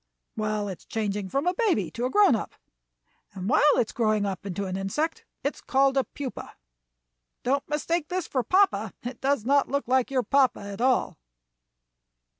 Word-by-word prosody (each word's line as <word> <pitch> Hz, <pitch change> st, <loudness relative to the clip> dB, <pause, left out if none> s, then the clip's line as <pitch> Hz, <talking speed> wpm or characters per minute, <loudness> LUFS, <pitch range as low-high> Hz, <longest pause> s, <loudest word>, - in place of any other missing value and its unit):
"Well, 215 Hz, -1 st, -1 dB
it 190 Hz, -3 st, -6 dB
is -, -, -21 dB
changing 205 Hz, -3 st, -3 dB
from 275 Hz, -, -1 dB
a 360 Hz, -, +2 dB
baby 370 Hz, -, +1 dB
to 240 Hz, +2 st, -3 dB
a -, -, 0 dB
grown 405 Hz, -, +5 dB
up, 220 Hz, -, -5 dB, 0.8 s
and 190 Hz, -1 st, -5 dB
while 290 Hz, +7 st, +4 dB
it -, -, +3 dB
is -, -, -9 dB
growing 215 Hz, -3 st, +1 dB
up 195 Hz, 0 st, -4 dB
into 195 Hz, +1 st, -3 dB
an 185 Hz, -1 st, -3 dB
insect 195 Hz, +12 st, -2 dB, 0.2 s
it 280 Hz, -, 0 dB
is -, -, -16 dB
called 270 Hz, 0 st, +2 dB
a 270 Hz, -, +3 dB
pupa. 275 Hz, -3 st, -7 dB, 0.9 s
Don't 275 Hz, +3 st, 0 dB
mistake 300 Hz, +2 st, -1 dB
this 365 Hz, 0 st, -2 dB
for 260 Hz, -, 0 dB
papa 305 Hz, -, +2 dB
it 245 Hz, 0 st, -6 dB
does 275 Hz, -5 st, +1 dB
not 280 Hz, +2 st, +3 dB
look 280 Hz, -1 st, -1 dB
like 260 Hz, 0 st, +2 dB
your 260 Hz, -2 st, +1 dB
papa 275 Hz, -1 st, +2 dB
at 200 Hz, +2 st, -7 dB
all." 255 Hz, -, +1 dB
255 Hz, 190 wpm, -26 LUFS, 210-280 Hz, 0.9 s, grown